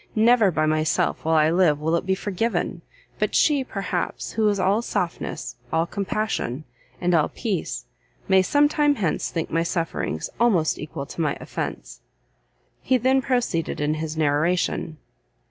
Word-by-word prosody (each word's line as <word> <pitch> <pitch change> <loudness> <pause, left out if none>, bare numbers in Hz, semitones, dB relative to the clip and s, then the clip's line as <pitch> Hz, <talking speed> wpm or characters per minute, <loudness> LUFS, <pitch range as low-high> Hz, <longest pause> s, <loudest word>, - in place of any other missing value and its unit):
never 225 -1 +5
by 155 -3 +1
myself 155 0 +1
while 160 0 +2
I 155 0 +4
live 170 -4 +3
will 160 +2 +1
it 170 - -2
be 190 - +2
forgiven, 205 +4 -2 0.4
but - - 0
she, 290 -3 +4
perhaps, 195 -7 -3
who 220 -1 +2
is 200 -1 0
all 195 +4 +2
softness, 180 - -3
all 165 +1 +2
compassion, 195 - -2 0.4
and 180 0 +1
all 155 -3 +3
peace, 205 -8 -3 0.4
may 190 -1 +5
some 290 +10 +4
time 295 -1 +2
hence 190 - -1
think 165 -2 -3
my 165 - +2
sufferings 165 - -2
almost 195 -10 +2
equal 140 -2 -6
to 165 - -6
my 150 -3 0
offence." - - -6 0.8
He 260 - +2
then 260 +2 +3
proceeded 245 - -1
in 150 +1 +1
his 155 0 -4
narration. 155 +2 0
180 Hz, 155 wpm, -24 LUFS, 155-220 Hz, 0.8 s, never